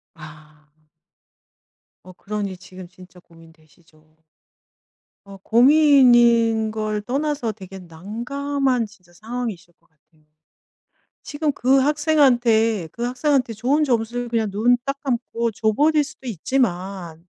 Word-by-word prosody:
아. 155 -1 -15 1.3
어 185 - -13
그러니 200 0 -5
지금 185 0 -13
진짜 180 0 -17
고민되시죠. 160 -1 -23 1.1
어 200 0 -12
고민인 240 -4 +4
걸 215 -1 -3
떠나서 275 -1 -2
되게 195 -2 -11
난감한 240 - -3
진짜 185 -5 -22
상황이실 215 -3 -7
것 170 - -35
같아요. 155 0 -35 1.0
지금 295 0 -2
그 265 0 +2
학생한테 245 - +2
그 235 - -8
학생한테 255 0 0
좋은 260 +8 0
점수를 240 -1 -2
그냥 225 -3 -1
눈 235 +5 +2
딱 275 0 -3
감고 235 -3 -2
줘버릴 290 +9 +1
수도 295 -2 -13
있지만 185 -6 -3
225 Hz, 235 characters per minute, -21 LUFS, 185-255 Hz, 1.3 s, 고민인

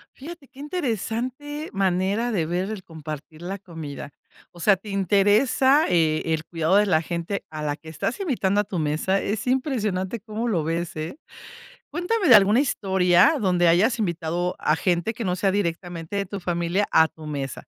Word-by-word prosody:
Fíjate 305 +1 -10
qué 260 +1 -18
interesante 290 - -3
manera 195 +4 0
de 180 -7 0
ver 180 +4 -2
el 205 -4 -6
compartir 155 -1 -9
la 190 +3 -4
comida. 160 -6 -8 0.4
O 175 - -15
sea, 200 +4 +4
te 195 +3 -12
interesa, 205 - +3
eh, 160 -3 +2
el 160 0 -2
cuidado 165 +2 0
de 205 +1 +5
la 160 -6 +2
gente 170 +4 -4
a 155 0 -6
la 145 -1 -1
que 160 +1 -12
estás 160 - -3
invitando 225 - 0
a - - -3
tu 190 -3 -4
mesa. 155 +6 0
Es 210 +3 -3
impresionante, 235 -6 -1
cómo 220 +3 -4
lo 180 -9 0
ves, 165 +2 -3
¿eh? 155 - -5 0.7
Cuéntame 355 +5 -1
de 245 - +10
alguna 210 +3 +5
historia 190 - +3
donde 180 -5 +2
hayas 195 +9 +3
invitado 175 -1 -1
a 155 - +2
gente 175 +5 0
que 230 - -5
no 180 -1 0
sea 195 +1 +1
directamente 175 -2 -3
de 200 - -1
tu 200 +1 -6
familia 175 +2 -1
a 160 - +6
tu 160 0 -13
mesa. 140 -3 -5
190 Hz, 180 wpm, -24 LUFS, 165-225 Hz, 0.7 s, de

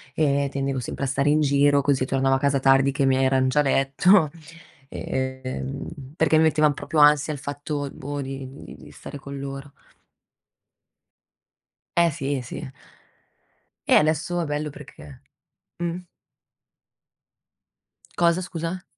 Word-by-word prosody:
e 140 -2 +1
tendevo 135 -1 -2
sempre 130 - -5
a - - -1
stare 140 +2 +1
in 155 +1 +3
giro, 140 0 +3
così 135 -2 +1
tornavo 135 0 +1
a 130 - 0
casa 140 -1 +1
tardi 135 +1 +4
che 140 0 -1
i - - +3
miei 130 0 +3
eran 130 0 +2
già 150 +3 +1
a - - 0
letto, 145 +5 +3 0.6
ehm, 130 +1 -4 0.3
perché 160 -1 +3
mi 160 - +4
mettevano 155 -2 +3
proprio 155 - -2
ansia 150 +1 +5
il 145 - -7
fatto, 145 +1 -4
boh, 145 +1 -5
di 135 0 -6 0.2
di - - -11
di - - -14
stare 145 - -10
con 140 0 -8
loro. 135 +1 -7 2.2
Eh 170 -1 +4
si, 145 -2 -3
eh 130 - -4
sì. 130 +3 -7 1.1
E - - +3
adesso 160 +3 +2
è - - -1
bello 150 0 -3
perché 75 - -13 0.6
uhm. 175 +1 -3 2.1
Cosa, 170 +1 +2
scusa? 175 0 -5
140 Hz, 145 wpm, -24 LUFS, 135-155 Hz, 2.2 s, ansia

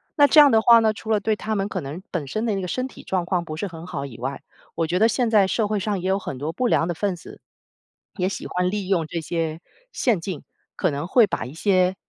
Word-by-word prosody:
那 290 - +6
这 285 +2 +6
样 290 -1 +9
的 220 -2 +4
话 235 0 +7
呢， 220 -1 +2
除 220 +1 -10
了 210 - +3
对 215 +2 0
他 220 +1 -4
们 195 -1 -1
可 190 -4 -4
能 145 +6 -7
本 165 -5 -2
身 215 - -2
的 215 - 0
那 195 - -2
个 180 - -4
身 255 +5 -2
体 - - -14
状 185 -2 -1
况 175 -1 0
不 155 -2 -7
是 200 - -3
很 165 -2 -9
好 140 -5 -5
以 130 -5 -10
外， 135 +3 -4 0.3
我 165 -1 0
觉 180 +3 0
得 225 +1 +5
现 245 -2 +1
在 205 -4 +4
社 215 +1 0
会 210 0 -1
上 205 -2 -1
也 185 - -3
有 190 - +2
很 145 -9 -6
多 150 +4 -4
不 255 +5 0
良 165 - +2
的 175 - -1
分 200 +3 -1
子， - - -13 0.8
也 185 -1 0
喜 - - -6
欢 180 0 0
利 205 -3 -3
用 175 -5 +1
这 165 +2 -4
些 165 0 -3 0.3
陷阱， 190 - -1 0.3
可 - - +1
能 145 +2 -3
会 230 +1 +5
把 190 - -3
一 130 - -9
些 185 +1 +2
190 Hz, 300 characters per minute, -23 LUFS, 165-215 Hz, 0.8 s, 样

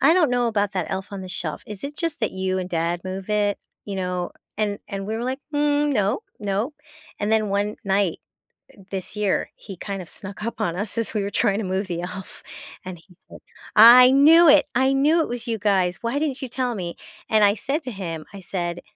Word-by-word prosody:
I 290 +4 +6
don't 330 -7 +3
know 245 -1 +1
about 205 -2 0
that 185 -4 -2
Elf 190 +1 -4
on 200 - -5
the 185 - -8
Shelf, 170 -3 -2
is 210 +1 -6
it 290 +1 -6
just 330 -5 -1
that 220 - 0
you 190 0 -1
and 180 -1 -4
dad 170 +1 -1
move 190 +1 -6
it?" 205 -1 +1 0.3
You 200 -2 -5
know, 180 -1 -2 0.3
and 205 -1 -1
and 195 -1 -5
we 220 +1 -2
were 235 - -3
like, 260 +2 -3
"Mm, 290 0 +2
no, 205 -4 +1 0.2
no" 205 +6 -1 0.5
and 205 +1 -1
then 215 -1 +2
1 205 +1 -1
night, 195 -3 +1 0.6
eh, - - -23
this 190 0 -3
year, 210 -2 0
he 195 -3 -10
kind 195 +1 -5
of 175 - -11
snuck 200 +1 -5
up 230 - -5
on 175 -6 -1
us 205 +4 -1
as 230 - +1
we 210 - 0
were 200 - -2
trying 200 0 +2
to - - -2
move 190 +2 -2
the 170 -2 -3
elf, 185 +2 -7 0.4
and 185 -1 -6
he 180 +2 -21
said, - - -12 0.4
"I 240 +3 +9
knew 315 +5 +7
it! 290 -1 +7
I 265 +2 +3
knew 300 +5 +3
it - - -1
was 240 0 -5
you 230 -1 -1
guys. 190 -4 +1
Why 235 +4 -1
didn't 290 -3 -2
you 260 - -5
tell 250 -1 -1
me?" 175 -4 -5 0.3
and 215 -1 +4
I 200 0 +5
said 275 - -1
to 255 - -5
him, 170 -6 -6
I 200 - -8
said, 175 -1 -3
205 Hz, 235 wpm, -23 LUFS, 190-245 Hz, 0.6 s, I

